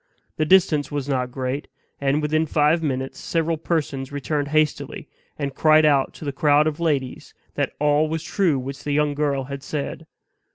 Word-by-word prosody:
The 155 - +1
distance 170 -6 +4
was 145 -2 -3
not 130 -3 -1
great; 130 +2 -3 0.3
and 140 +2 +1
within 155 +1 +1
five 150 +2 +2
minutes 135 -3 -3
several 165 0 0
persons 150 -5 -2
returned 145 +1 -2
hastily, 155 0 -1 0.3
and 140 -2 -3
cried 155 +1 +5
out 140 -3 +3
to - - -9
the 140 - -1
crowd 145 +1 +3
of 155 0 -2
ladies 145 -6 -2 0.2
that - - -1
all 150 +1 +2
was 160 0 -3
true 175 -8 +1
which 135 +2 -6
the 145 - -2
young 150 0 +2
girl 145 -2 0
had 140 +1 -7
said. 150 +3 -5
145 Hz, 175 wpm, -23 LUFS, 140-155 Hz, 0.3 s, cried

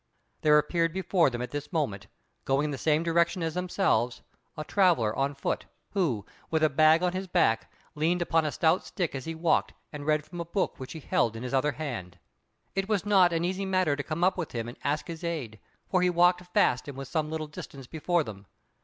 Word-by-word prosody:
There 150 -1 +6
appeared 165 +2 +1
before 180 -3 +2
them 120 -1 -4
at 125 - -6
this 145 +3 -5
moment, 105 - -2 0.4
going 135 +2 +1
in 150 - -2
the 140 - -3
same 155 0 +2
direction 170 +1 +1
as 160 -1 -1
themselves, 175 - 0 0.3
a 155 - -3
traveller 160 - +2
on 140 +1 0
foot, 135 - -2 0.2
who, 140 - 0 0.2
with 160 -1 +1
a 155 - +4
bag 155 +4 +5
on 180 -1 +1
his 190 +1 -3
back, 140 -11 +2 0.2
leaned 165 +4 +1
upon 165 -2 +2
a 150 - -1
stout 165 +4 +2
stick 180 -5 -3
as 135 -2 -5
he 165 - -4
walked 160 0 +1 0.2
and 145 0 -7
read 150 -1 +2
from 175 +1 -7
a - - -1
book 185 +3 -2
which 130 0 -7
he 160 - -8
held 115 -4 +1
in 115 - -6
his 125 - -5
other 145 +2 +2
hand. 95 - -5 0.6
It 195 +1 -2
was 205 -2 +1
not 190 -4 +5
an 165 0 0
easy 190 +2 -2
matter 185 -6 +2
to 145 - -3
come 155 +3 -3
up 185 +1 +3
with 165 - -4
him 115 -1 -3
and 120 - -7
ask 145 +2 0
his 165 0 -7
aid, 140 -11 -4 0.3
for 185 -2 +2
he 180 - +3
walked 180 +1 +3
fast, 125 -5 +2
and 140 -2 -7
was 135 -1 -6
some 155 +2 -1
little 160 0 -3
distance 140 -2 -9
before 165 +4 0
them. 100 -4 -10
155 Hz, 225 wpm, -28 LUFS, 135-175 Hz, 0.6 s, There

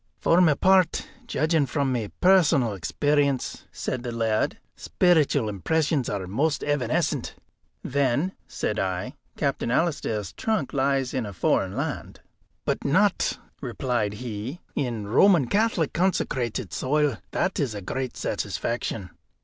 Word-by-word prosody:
"For 170 +2 +4
my 160 -5 +5
part, 185 0 +3 0.2
judging 155 -6 +1
from 135 0 0
my 115 -5 -2
personal 165 - +4
experience," 140 - 0
said 130 - -3
the 120 -1 -4
laird, 115 -2 0 0.2
"speeritual 150 -8 +2
impressions 140 - 0
are 100 -2 -3
most 140 - 0
evanescent." 145 -5 0 0.5
"Then," 140 +5 +1 0.2
said 105 - -2
I, 95 +6 -2 0.2
"Captain 140 -5 -1
Alister's 120 - 0
trunk 215 -11 -1
lies 135 -1 +1
in 120 -5 -1
a 100 - -7
foreign 85 - +1
land." - - -4 0.5
"But - - -1
not," - - +2 0.2
replied 120 -6 -1
he, 115 +6 -5
"in 120 -7 -2
Roman 155 - +5
Catholic 200 - +1
consecrated 150 - -1
soil. 145 -2 +1
That 190 - -1
is 130 -8 -1
a - - -4
great 130 +6 -4
satisfaction." 110 -5 -3
135 Hz, 125 wpm, -25 LUFS, 115-155 Hz, 0.5 s, my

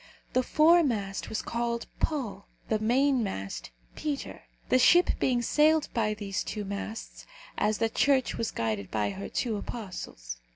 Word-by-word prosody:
The 255 - +4
foremast 265 - +3
was 220 - -2
called 235 0 -2
Paul, 235 -10 -2 0.2
the 220 - +2
mainmast 220 - 0 0.3
Peter 295 -2 -4 0.2
the 255 - +5
ship 350 +7 +6
being 245 -2 +2
sailed 305 +4 +3
by 215 -2 +1
these 200 -2 -3
two 210 -1 -4
masts, 200 +3 -6 0.3
as 210 0 +1
the 225 - +2
Church 260 +3 +2
was 230 - -1
guided 110 -4 -2
by 105 -2 0
her 100 +1 -6
two 225 -4 -1
apostles. 185 - -6
225 Hz, 140 wpm, -29 LUFS, 195-260 Hz, 0.3 s, ship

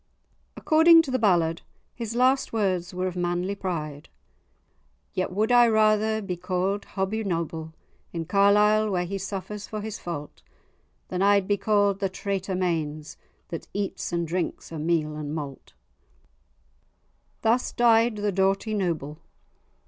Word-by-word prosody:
According 330 +1 +6
to 280 - -5
the 255 - +1
ballad, 170 -6 +2 0.3
his 230 -1 -5
last 255 +2 +2
words 185 -6 0
were 185 0 -3
of 185 -1 -3
manly 175 +2 -1
pride:— 155 -7 -5 1.0
"Yet 185 - -1
wad 215 +5 0
I 240 -1 +7
rather 220 0 +2
be 180 -3 -4
ca'd 185 +3 -2
Hobbie 200 +3 -1
Noble, 165 -4 -3 0.4
In 165 -1 -4
Carlisle, 210 +3 +4
where 180 -3 0
he 195 +2 -4
suffers 200 +2 -6
for 215 - -5
his 215 0 -6
fault, 155 -4 -7 0.7
Than 185 0 -2
I'd 200 -1 +4
be 205 - +3
ca'd 205 -1 +2
the 195 -1 0
traitor 190 0 -3
Mains, 155 -4 -2 0.3
That 165 -3 -6
eats 200 -1 -3
and 170 -1 -1
drinks 175 0 -3
o' 160 - -5
meal 155 -1 0
and 150 0 -5
malt." 140 -4 -7 1.7
Thus 235 +3 +2
died 230 -1 +4
the 205 0 -1
doughty 195 +3 +1
Noble. 165 -7 -2
195 Hz, 140 wpm, -26 LUFS, 170-215 Hz, 1.7 s, I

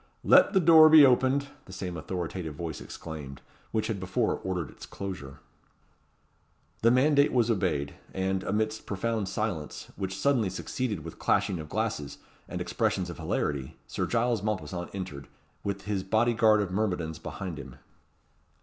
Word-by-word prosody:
"Let - - +6
the 190 - +5
door 160 -2 +8
be 155 -2 +9
opened," 135 +2 +3 0.2
the - - -13
same 90 -1 -5
authoritative 85 -1 -4
voice 80 -2 -5
exclaimed, 75 -4 -8 0.3
which 110 - 0
had 110 -4 -2
before 95 0 0
ordered 90 -5 -3
its - - -12
closure. 95 -9 -7 1.4
The 115 - +5
mandate 140 +3 +4
was 120 -2 +3
obeyed; 90 -9 0 0.2
and, 95 0 -1
amidst 110 +2 -2
profound 105 0 -1
silence, 95 -7 -4
which 95 -1 -3
suddenly 120 -3 +2
succeeded 105 0 -3
the 80 - -6
clashing 100 0 0
of 75 -1 -8
glasses, 70 -1 -2 0.3
and - - -4
expressions - - -1
of - - -10
hilarity, 70 -3 -2
Sir - - -3
Giles 120 -2 +1
Mompesson 95 -4 -3
entered, 80 -8 -6 0.4
with 100 0 -3
his 100 -1 -1
body 110 +5 +2
guard 110 -2 +4
of 95 -3 -3
myrmidons 90 -6 -1
behind 90 -6 -6
him. 70 -2 -9
95 Hz, 150 wpm, -28 LUFS, 85-110 Hz, 1.4 s, be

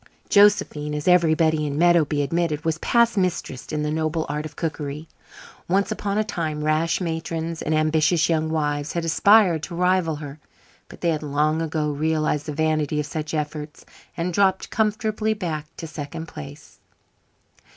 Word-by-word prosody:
Josephine, 200 -8 +3
as 150 +2 -4
everybody 160 -3 +3
in 145 0 -3
Meadowby 160 -4 +3
admitted, 165 +1 -1
was 160 0 0
past 235 -2 +2
mistress 180 -8 -2
in 150 -1 -1
the 150 - -1
noble 155 +1 -1
art 150 +1 -3
of 150 - -17
cookery. 150 -1 -4 0.6
Once 195 +3 +1
upon 200 0 -2
a 215 - +2
time 160 -7 -3
rash 155 +2 +1
matrons 165 -1 -3
and 155 - 0
ambitious 155 +2 +2
young 160 -1 0
wives 150 -2 -1
had 170 -1 -2
aspired 180 0 +4
to 170 +2 -6
rival 180 -2 +2
her, 145 0 -8 0.5
but - - -13
they 170 - +1
had 155 -2 0
long 150 +2 0
ago 155 -2 -1
realised 155 0 0
the - - -2
vanity 155 -1 0
of 150 - -1
such 155 +1 -4
efforts 150 0 -5 0.3
and 175 +1 -2
dropped 190 0 +1
comfortably 215 0 0
back 160 -7 -4
to 165 - -6
second 155 0 -7
place. 75 - -11
160 Hz, 160 wpm, -23 LUFS, 150-175 Hz, 0.6 s, aspired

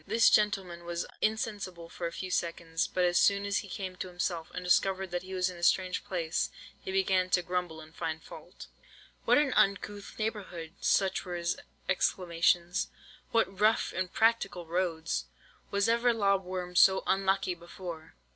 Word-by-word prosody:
"This 225 +3 +5
gentleman 190 -5 +1
was 170 0 -3 0.2
insensible 205 -6 -2
for 170 0 -4
a - - -5
few 185 +1 -6
seconds; 165 -2 -1
but 180 - 0
as 175 0 +3
soon 200 0 +3
as 200 0 +1
he 205 - -8
came 185 -1 -5
to 185 - -4
himself, 175 -2 -3
and 180 - -5
discovered 190 +1 +2
that 175 0 -1
he 190 +1 -7
was 180 -1 +2
in 180 - -11
a - - -11
strange 185 +1 +2
place, 175 -5 -1 0.3
he - - -4
began 190 -1 +2
to 180 -1 +2
grumble 180 -2 -2
and 155 +1 -14
find 160 0 -4
fault. - - -11 0.6
"'What - - +5
an 290 -3 +2
uncouth 200 +1 +1
neighbourhood!' 190 -7 -4
Such 195 -1 +2
were 180 -2 -5
his 170 0 -1 0.3
exclamations. 175 -1 +1 0.4
'What 210 -4 +1
rough 215 +2 +3
impracticable 185 -1 +1
roads! 165 - -1 0.4
Was 200 0 +1
ever 235 +1 +3
lob 200 -3 +2
worm 180 -1 -5
so 190 +2 +6
unlucky 195 -1 +1
before! 170 - -9
185 Hz, 165 wpm, -30 LUFS, 175-195 Hz, 0.6 s, so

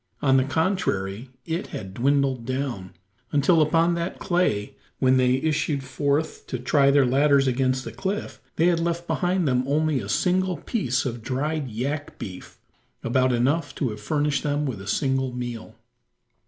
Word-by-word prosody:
On 135 -2 +4
the 130 - +4
contrary, 135 - -1 0.2
it 165 +2 -3
had 95 -2 -7
dwindled 135 +1 +1
down, 120 -8 -4 0.4
until 150 +3 +4
upon 165 +3 +3
that 170 +1 -3
clay 175 - 0 0.2
when 130 0 +3
they 125 0 +3
issued 145 0 0
forth 140 +4 -1
to 125 - -3
try 140 +3 +3
their 140 -1 +5
ladders 140 +2 +4
against 130 0 +1
the - - -6
cliff, 195 +2 -4
they 165 - +2
had 175 -1 +3
left 170 0 -1
behind 180 -1 0
them 125 -1 +2
only 150 0 +1
a - - -6
single 185 -1 +1
piece 140 - -1
of 120 -2 -3
dried 140 +3 -2
yak 140 +7 -4
beef 90 -2 -9 0.5
about 130 +2 +2
enough 140 +5 0
to 130 -5 -1
have 105 0 -8
furnished 145 +3 0
them 145 0 -1
with 120 -8 -4
a 95 - -10
single 130 +3 0
meal. 120 -2 -6
140 Hz, 165 wpm, -24 LUFS, 125-155 Hz, 0.5 s, their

